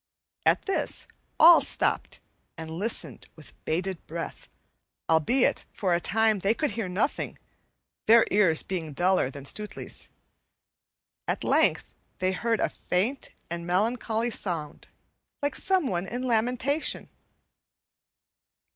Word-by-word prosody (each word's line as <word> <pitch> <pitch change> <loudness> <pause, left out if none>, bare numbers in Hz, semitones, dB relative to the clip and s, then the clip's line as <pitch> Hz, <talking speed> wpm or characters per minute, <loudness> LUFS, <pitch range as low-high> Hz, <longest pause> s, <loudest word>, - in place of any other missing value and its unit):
At - - +3
this 390 - 0 0.3
all 335 +2 +9
stopped - - 0 0.4
and 160 -1 -7
listened 200 +8 -2
with 155 - -14
bated 180 +2 -2
breath, 165 +1 -6 0.6
albeit 165 - +2
for 185 -4 0
a 170 - +2
time 220 +1 +2
they 200 +4 +1
could 300 -1 -1
hear 205 -3 -3
nothing, 195 +10 -1 0.7
their 230 +1 +7
ears 185 -6 +4
being 165 -5 -4
duller 180 -2 +2
than 140 0 -10
Stutely's. 210 +8 -3 1.2
At - - -1
length - - +2 0.2
they 185 0 0
heard 225 +4 0
a - - +3
faint 220 +10 -2 0.2
and 170 0 -5
melancholy 225 +4 0
sound, 165 -8 -4 0.6
like 285 -1 0
someone 265 - +1
in 245 +4 -4
lamentation. 250 +5 0
200 Hz, 115 wpm, -27 LUFS, 175-235 Hz, 1.2 s, all